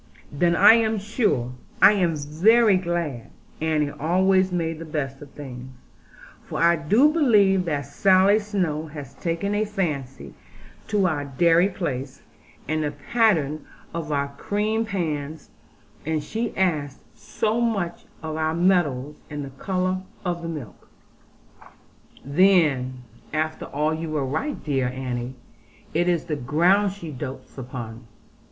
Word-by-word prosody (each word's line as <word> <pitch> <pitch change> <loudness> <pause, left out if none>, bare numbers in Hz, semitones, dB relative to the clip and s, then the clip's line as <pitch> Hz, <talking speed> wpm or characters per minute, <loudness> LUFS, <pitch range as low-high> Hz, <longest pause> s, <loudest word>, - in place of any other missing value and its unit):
'Then, 170 +4 +2
I 200 +5 +8
am 225 -1 +2
sure, 205 - 0 0.3
I - - +8
am 180 -6 +1
very 195 +10 +4
glad,' 170 -9 -2 0.3
Annie 155 -2 +1
always 185 +5 +2
made 165 -2 -2
the - - -6
best 145 -4 -4
of 145 - -10
things; 130 -3 -9 0.7
'for - - -7
I 170 +1 +5
do 215 - +3
believe 205 - +4
that 145 -4 -2
Sally 195 +2 +4
Snowe 180 -7 -2
has 145 -3 -9
taken 170 +4 -2
a 210 +1 +1
fancy 155 -11 -4 0.5
to 205 -3 +1
our 150 -5 0
dairy 165 +6 +3
place, 135 -8 -5 0.4
and 155 0 0
the 150 - 0
pattern 155 - +1 0.3
of 165 -2 -4
our 140 -1 0
cream 215 +5 -1
pans; 160 -7 -4 0.5
and 155 0 -1
she 225 +6 -4
asked 155 -7 0
so 225 +2 -2
much 205 -7 -1 0.2
about 155 0 -4
our 160 0 0
meadows, 150 -6 +1
and 145 -2 -5
the 135 - -9
colour 185 +5 -2 0.2
of 175 -1 -2
the 165 - -5
milk 145 - -8 0.7
' - - -24
'Then, 140 -6 +3 0.3
after 155 0 -2
all, 150 +2 -1
you 160 0 -4
were 150 -3 -1
right, 155 - -3
dear 135 -4 0
Annie; 125 -1 -4 0.6
it 175 +2 +2
is 170 -2 0
the 155 -3 -2
ground 175 +10 +2
she 175 -5 -8
dotes 135 -1 -7
upon.' 120 -3 -7
160 Hz, 140 wpm, -24 LUFS, 145-190 Hz, 0.7 s, I